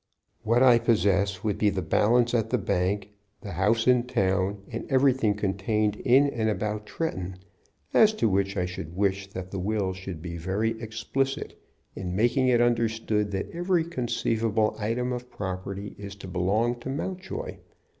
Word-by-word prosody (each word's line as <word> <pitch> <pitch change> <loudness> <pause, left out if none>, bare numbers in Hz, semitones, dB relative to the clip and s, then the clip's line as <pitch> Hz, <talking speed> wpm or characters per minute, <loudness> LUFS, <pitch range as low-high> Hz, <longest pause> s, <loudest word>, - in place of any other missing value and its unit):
"What 115 +3 +3
I 125 -2 +7
possess 100 -4 +2
would 105 -2 -1
be 105 - +4
the 95 -2 -2
balance 120 +7 +3
at 115 -2 +1
the 125 - +2
bank, 100 0 -1 0.3
the 105 -4 -7
house 105 +6 +2
in 125 -1 +4
town, 95 -2 0
and 115 +5 -6
everything 130 -5 +3
contained 105 +1 0
in 135 +3 +4
and 115 -5 0
about 105 +1 -2
Tretton, 95 - -3 0.6
as 215 -1 +6
to 215 - +1
which 100 0 0
I 90 - +1
should 90 -1 -7
wish 100 -1 0
that 95 -1 -7
the 95 - -3
will 100 0 -1
should 95 -2 -7
be 85 +1 -6
very 95 +6 -1
explicit 135 +5 -2 0.4
in 90 -1 -4
making 120 +5 +2
it 120 -2 +4
understood 110 -3 +1
that 95 - -3
every 175 0 +1
conceivable 115 -7 0
item 120 +4 -1
of 125 0 -6
property 95 +1 -5
is 100 -1 -7
to 100 - -10
belong 105 +7 0
to 120 - -6
Mountjoy. 190 - -4
105 Hz, 165 wpm, -27 LUFS, 95-120 Hz, 0.6 s, I